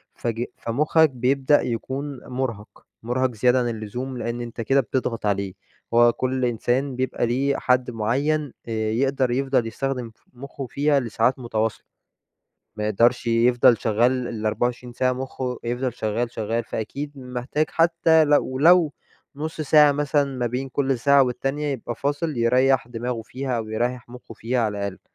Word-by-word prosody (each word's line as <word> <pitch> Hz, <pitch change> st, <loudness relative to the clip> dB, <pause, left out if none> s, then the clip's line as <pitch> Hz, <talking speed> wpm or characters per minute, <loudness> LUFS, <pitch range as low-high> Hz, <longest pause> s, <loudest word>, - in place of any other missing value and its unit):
فج 115 Hz, 0 st, -2 dB
فمخك 150 Hz, +6 st, +2 dB
بيبدأ 130 Hz, +3 st, +2 dB
يكون 135 Hz, +4 st, -4 dB
مرهَق، 125 Hz, -5 st, -5 dB, 0.2 s
مرهَق 125 Hz, +2 st, 0 dB
زيادة 125 Hz, +4 st, +3 dB
عن 120 Hz, -1 st, 0 dB, 0.2 s
اللزوم؛ 130 Hz, +3 st, -5 dB
لأن 120 Hz, +1 st, -3 dB
أنت 120 Hz, 0 st, -6 dB
كده 135 Hz, +4 st, +3 dB
بتضغط 115 Hz, -2 st, -3 dB
عليه، 100 Hz, -2 st, -1 dB, 0.4 s
هو 120 Hz, 0 st, +6 dB
كل 130 Hz, 0 st, -1 dB
إنسان 125 Hz, +3 st, 0 dB
بيبقى 130 Hz, -1 st, -1 dB
ليه 135 Hz, +3 st, 0 dB
حد 125 Hz, -1 st, +1 dB
معين، 140 Hz, +7 st, -1 dB
آآ -, -, -5 dB, 0.2 s
يقدر 135 Hz, +1 st, +1 dB
يفضل 130 Hz, -2 st, +1 dB
يستخدم 125 Hz, 0 st, -3 dB
ف -, -, -36 dB
مخه 135 Hz, +1 st, -8 dB
فيها 145 Hz, +2 st, +2 dB
لساعات 120 Hz, +2 st, 0 dB
متواصلة، 110 Hz, -2 st, -2 dB, 0.9 s
ما 105 Hz, -1 st, -3 dB
يقدرش 120 Hz, +3 st, +2 dB
يفضل 120 Hz, 0 st, +4 dB
شغال 120 Hz, +3 st, +1 dB
ال24 120 Hz, +2 st, -2 dB
ساعة، 130 Hz, +1 st, +1 dB
مخه 130 Hz, -1 st, -4 dB
يفضل 120 Hz, +1 st, -2 dB
شغال 115 Hz, +1 st, -2 dB
شغال، 115 Hz, +1 st, -2 dB
فأكيد 140 Hz, +7 st, -5 dB
محتاج 125 Hz, +4 st, -2 dB
حتى 165 Hz, -1 st, +4 dB
لو 145 Hz, -3 st, +1 dB
لو 170 Hz, -1 st, +5 dB, 0.4 s
نص 155 Hz, +2 st, -4 dB
ساعة 150 Hz, 0 st, +6 dB
مثلًا 145 Hz, 0 st, +1 dB
ما 120 Hz, -1 st, 0 dB
بين 130 Hz, +3 st, -4 dB
كل 135 Hz, -2 st, 0 dB
ساعة 140 Hz, +2 st, +5 dB
والتانية، 135 Hz, +4 st, -2 dB
يبقى 120 Hz, -4 st, -4 dB
فاصل 145 Hz, 0 st, -2 dB
يريَّح 125 Hz, +2 st, +3 dB
دماغه 120 Hz, 0 st, -4 dB
فيها، 130 Hz, +1 st, -4 dB
أو 110 Hz, -1 st, -5 dB
يريَّح 120 Hz, +2 st, -2 dB
مخه 125 Hz, 0 st, -11 dB
فيها 120 Hz, +2 st, -2 dB
على 105 Hz, -2 st, -1 dB
الأقل. 100 Hz, -2 st, -4 dB
125 Hz, 155 wpm, -23 LUFS, 115-135 Hz, 0.9 s, هو